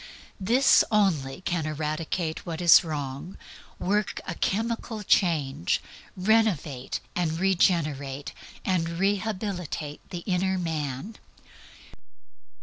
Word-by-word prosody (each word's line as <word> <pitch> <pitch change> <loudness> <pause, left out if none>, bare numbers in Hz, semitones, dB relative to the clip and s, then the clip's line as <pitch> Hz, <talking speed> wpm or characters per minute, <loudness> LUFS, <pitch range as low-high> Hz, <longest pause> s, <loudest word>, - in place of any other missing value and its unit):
This 240 +7 +5
only 180 -9 +1
can 175 -4 -1
eradicate 155 +2 -2
what 165 -2 -5
is 175 +1 +7
wrong, 145 +1 -5 0.4
work 205 +2 0
a 175 - -3
chemical 225 +3 -2
change, 150 - +2 0.4
renovate 185 - +1 0.2
and 170 -3 0
regenerate, 155 -7 +1 0.3
and 175 -3 +1
rehabilitate 195 -6 -2
the 175 -1 -6
inner 190 0 +1
man. 160 - -3
175 Hz, 90 wpm, -27 LUFS, 150-195 Hz, 0.4 s, is